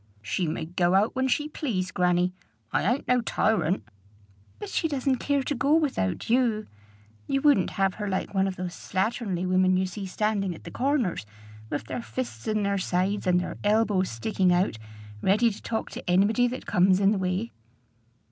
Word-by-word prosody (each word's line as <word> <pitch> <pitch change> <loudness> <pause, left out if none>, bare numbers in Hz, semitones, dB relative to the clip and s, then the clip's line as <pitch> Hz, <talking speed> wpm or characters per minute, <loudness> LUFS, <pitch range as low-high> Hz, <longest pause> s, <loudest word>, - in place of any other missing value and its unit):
"She 175 - -1
may 160 +1 -3
go 175 +2 +1
out 210 +6 +2
when 260 0 +1
she 295 +3 +1
please, 220 - -3
grannie. 180 0 +2 0.4
I 200 - +2
ain't 260 - -2
no 250 -1 +3
tyrant." 215 -5 +1 0.7
"But 415 - -7
she 330 - 0
doesn't 270 -3 0
care 280 +1 0
to 290 - -1
go 280 +4 +2
without 270 - 0
you. 230 -3 +2 0.6
You 275 - +1
wouldn't 285 -11 +4
have 195 -1 +2
her 205 - -2
like 190 +1 -2
one 195 0 +2
of 190 - -3
those 180 -1 -5
slatternly 190 -2 -2
women 185 0 +3
you 190 - +1
see 190 +1 -6
standing 195 -2 -1
at - - -14
the - - -9
corners, 250 - 0 0.4
with 145 - -3
their 125 +2 -5
fists 115 0 -6
in 215 -1 +1
their 200 0 0
sides 185 +2 -1
and 180 0 +4
their 180 - -5
elbows 205 -3 +2
sticking 180 - 0
out, 175 - +1 0.4
ready 215 +5 +3
to 200 - -10
talk 225 -1 -3
to - - -7
anybody 205 +7 +4
that 255 +2 -5
comes 185 +1 +3
in 200 0 +4
the 210 - 0
way." 185 +5 -1
195 Hz, 185 wpm, -26 LUFS, 180-235 Hz, 0.7 s, wouldn't